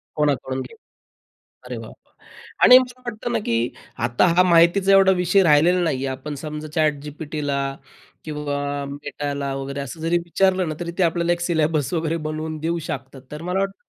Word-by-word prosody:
कोणाकडून 140 -3 0
घे - - -10 0.9
अरे - - -6
वाह! - - -8 0.2
वाह! - - -35 0.5
आणि 250 - +10
मला 255 0 -6
वाटतं 240 0 -4
ना 230 - +1
की 115 - +1 0.5
आता 120 +8 +3
हा 180 - +6
माहितीचा 175 +3 +4
एवढा 195 -1 +6
विषय 185 +2 +4
राहिलेला 170 +3 +4
नाहीये. 135 -5 -1
आपण 135 +3 -5
समजा 150 0 -6
ChatGPTला 150 -1 -1 0.7
किंवा 150 -2 -3 0.4
Metaला 145 -1 -4
वगैरे 140 +1 -5
असं 140 +4 -7
जरी 165 +2 +2
विचारलं 185 0 +1
ना, 155 - -3
तरी 170 -1 -4
ते 190 - +3
आपल्याला 170 +1 +1
एक 175 - -5
सिलेबस 160 -4 0
वगैरे 165 0 0
बनवून 155 0 -4
देऊ 170 +1 0
शकतात. 130 0 -6
तर 150 - -7
मला 180 +3 -1
वाटतं 195 0 -3
160 Hz, 170 wpm, -22 LUFS, 145-180 Hz, 0.9 s, आणि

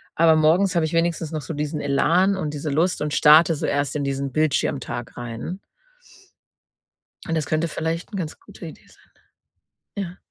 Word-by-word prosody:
Aber 160 -1 +5
morgens 170 +5 +3
habe 170 - +2
ich 160 - -4
wenigstens 165 -1 0
noch 155 - -3
so 145 - -6
diesen 150 +1 -3
Elan 170 +8 +2
und 155 -6 -3
diese 150 +1 -4
Lust 165 +6 0
und 150 -1 -2
starte 155 +2 +6
so - - -3
erst 145 -1 -1
in 145 - -1
diesen 140 -1 -3
Bildschirmtag 135 -5 -1
rein. 120 +10 -6 1.7
Und 165 - -1
das 155 -2 -1
könnte 155 +2 0
vielleicht 160 +4 -4
'n 195 - -3
ganz 160 -4 -5
gute 380 - -13
Idee - - -12
sein. - - -24 0.9
Ja. 185 -3 -5
155 Hz, 175 wpm, -23 LUFS, 145-170 Hz, 1.7 s, starte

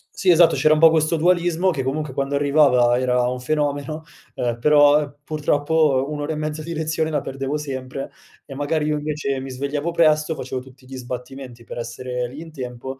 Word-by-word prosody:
Sì 190 - 0
esatto, 170 -1 +6
c'era 155 0 +4
un 155 - +1
po' 165 - +9
questo 160 0 +1
dualismo: 175 +2 +2
che 140 -6 -3
comunque 140 +1 -3
quando 140 +1 -2
arrivava 140 -4 +4
era 125 -1 +1
un 125 0 -4
fenomeno, 145 +3 -2 0.3
ehm, 120 -1 -2
però 145 +1 +5
purtroppo 150 -2 +1
un'ora 150 +1 -3
e - - -4
mezza 155 0 -4
di 170 +2 -6
lezione 160 0 -1
la 150 -2 -1
perdevo 135 +1 -4
sempre, 135 -2 -6 0.3
e 135 - -10
magari 150 +2 -1
io 150 0 0
invece 145 -2 -3
mi 135 0 -7
svegliavo 140 +5 -3
presto, 155 -1 +2
facevo 130 -1 -5
tutti 130 0 -17
gli 130 0 -9
sbattimenti 125 0 -8
per - - -9
essere 125 +1 -4
lì 135 +5 -10
in 165 -1 -10
tempo 130 -1 -7
145 Hz, 190 wpm, -21 LUFS, 130-155 Hz, 0.3 s, po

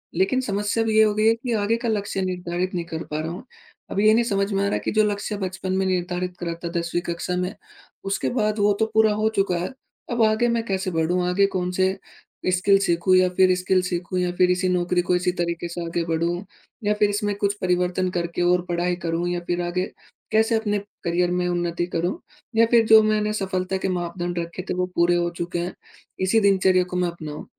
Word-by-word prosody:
लेकिन 195 +9 +2
समस्या 205 0 -1
अब 225 - -1
ये 220 0 +5
हो 215 -1 +3
गई 215 +1 +2
है 225 - +6
कि 240 +1 -4
आगे 215 +1 +1
का 235 - 0
लक्ष्य 200 -2 -1
निर्धारित 180 0 -2
नहीं 170 -1 -2
कर 160 -1 -5
पा 150 - -1
रहा 160 +1 -3
हूँ। 180 - -7 0.5
अब 200 - -1
ये 215 +1 +5
नहीं 235 +2 +4
समझ 200 -2 0
में 195 0 +1
आ - - +1
रहा - - -1
है - - 0
कि - - 0
जो 215 0 +3
लक्ष्य 205 +1 -4
बचपन 190 -1 -3
में 190 - +1
निर्धारित 180 -1 -2
करा 170 -1 -3
था 170 - -2
10वीं 170 +1 -2
कक्षा 180 +1 -3
में 180 +1 -2 0.5
उसके 195 - -1
बाद 215 0 0
वो 205 0 +4
तो 220 - +3
पूरा 220 -1 +4
हो 215 +1 +1
चुका 195 -3 +1
है 180 +9 -3 0.4
अब 235 - 0
आगे 220 +2 +3
मैं 235 -1 +1
कैसे 190 -3 -2
बढ़ूँ 170 +2 +1
आगे 195 +2 +3
कौन-से 185 0 0 0.5
स्किल 195 +2 +4
सीखूँ, 185 0 +2
या 185 0 +5
फ़िर 185 0 +4
स्किल 185 0 +1
सीखूँ 180 0 -2
या 180 0 0
फ़िर 180 0 +4
इसी 180 +1 +1
नौकरी 180 0 +1
को 180 - +3
इसी 180 0 +1
तरीके 170 -1 -3
से 170 0 -5
आगे 165 0 -2
बढ़ूँ 170 +3 -1 0.4
या 210 0 +2
फ़िर 210 0 +2
इसमें 205 0 -1
कुछ 200 0 0
परिवर्तन 180 0 +1
करके 170 0 -2
और 180 0 +3
पढ़ाई 175 +1 0
करूँ 170 +1 -1
या 175 - -1
फ़िर 175 0 0
आगे 175 +1 -1 0.5
कैसे 220 +1 +3
अपने 210 -2 0 0.3
करियर 175 +1 +1
में 180 0 0
उन्नति 175 -1 -1
करूँ 175 - -1 0.4
या 230 - +6
फ़िर 230 -2 +5
जो 220 0 +8
मैंने 215 0 +1
सफ़लता 190 -2 -2
के 190 - -2
मापदंड 175 -1 -3
रखे 170 +2 -5
थे - - +1
वो 180 0 0
पूरे 170 +1 +3
हो 175 0 +1
चुके 175 0 -3
हैं 175 +2 -3 0.5
इसी 225 +4 +3
दिनचर्या 190 -3 +4
को 180 0 -5
मैं 180 0 +1
अपनाऊँ, 155 -3 -8
185 Hz, 225 wpm, -23 LUFS, 175-205 Hz, 0.5 s, जो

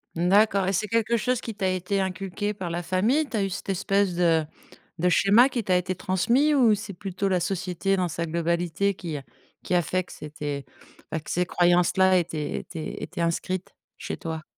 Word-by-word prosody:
Mmh 175 +2 +1
d'accord 200 -1 +4
et 195 - +1
c'est 205 +3 0
quelque 230 +1 +1
chose 250 +2 0
qui 225 - -6
t'a 195 -2 -1
été 185 +2 -1
inculqué 195 +2 -2
par 185 -4 -5
la 170 +1 -3
famille? 220 - +1
Tu 245 - -6
as 205 - +1
eu 195 - -1
cette 190 - -6
espèce 195 0 +1
de 165 -3 +3 0.5
de 180 +2 +3
schéma 210 +8 +5
qui 245 -3 -2
t'a 185 -2 +2
été 180 +1 0
transmis 235 - +2
ou 240 -6 +5
c'est 205 0 -7
plutôt 190 +2 -3
la 185 -2 +2
société 190 +2 -1
dans 180 -1 +1
sa 170 +1 -3
globalité 170 +4 0
qui 165 -5 -5
a 140 - -8 0.4
qui - - -3
a 175 - +4
fait 185 +3 -1
que - - -16
c'était 145 -2 -6 0.5
bah, 160 - -1
que 155 - -8
ces 180 +1 +1
croyances-là 180 +1 +4
étaient 155 -3 -3
étaient 160 -3 -6
étaient - - -5
inscrites 175 +2 -2 0.3
chez - - -5
toi? 160 -1 -5
185 Hz, 205 wpm, -25 LUFS, 170-200 Hz, 0.5 s, schéma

